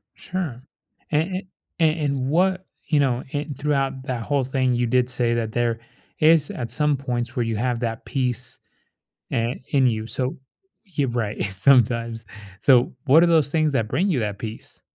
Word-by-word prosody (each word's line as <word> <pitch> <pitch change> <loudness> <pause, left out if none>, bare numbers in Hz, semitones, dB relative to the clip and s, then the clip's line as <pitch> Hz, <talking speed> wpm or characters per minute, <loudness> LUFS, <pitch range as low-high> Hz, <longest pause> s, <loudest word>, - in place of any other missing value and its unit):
Sure. 160 -10 -5 0.5
A 150 - +4
a 185 +3 -4 0.3
a - - +5 0.2
and 135 -2 -1
what 185 +4 +1 0.2
you 150 -3 +3
know, 130 -3 +1
and 145 -1 -3
throughout 135 -2 0
that 125 -3 -3
whole 140 +1 0
thing 130 -1 +1
you 120 0 +1
did 125 +1 +2
say 120 -2 +1
that 110 -2 -2
there 120 -1 0 0.4
is 155 -1 +5
at 120 -2 -5
some 150 +2 +1
points 125 -2 -3
where 120 - +1
you 115 -1 -2
have 120 +1 -1
that 115 -1 -3
peace, 125 -3 -2 0.7
eh, 115 +2 0
in 135 -3 +3
you, 110 -2 -1
so 125 +4 -2 0.5
Yeah, 150 -8 -1
right, 110 -3 -2
sometimes. 115 +2 +2 0.4
So, 130 -2 +4
what 155 +5 +6
are - - +4
those 155 -4 +3
things 155 -2 +2
that 115 -4 +1
bring 175 - 0
you 150 - +1
that 105 -3 -2
peace? 110 0 -8
130 Hz, 175 wpm, -23 LUFS, 120-145 Hz, 0.7 s, what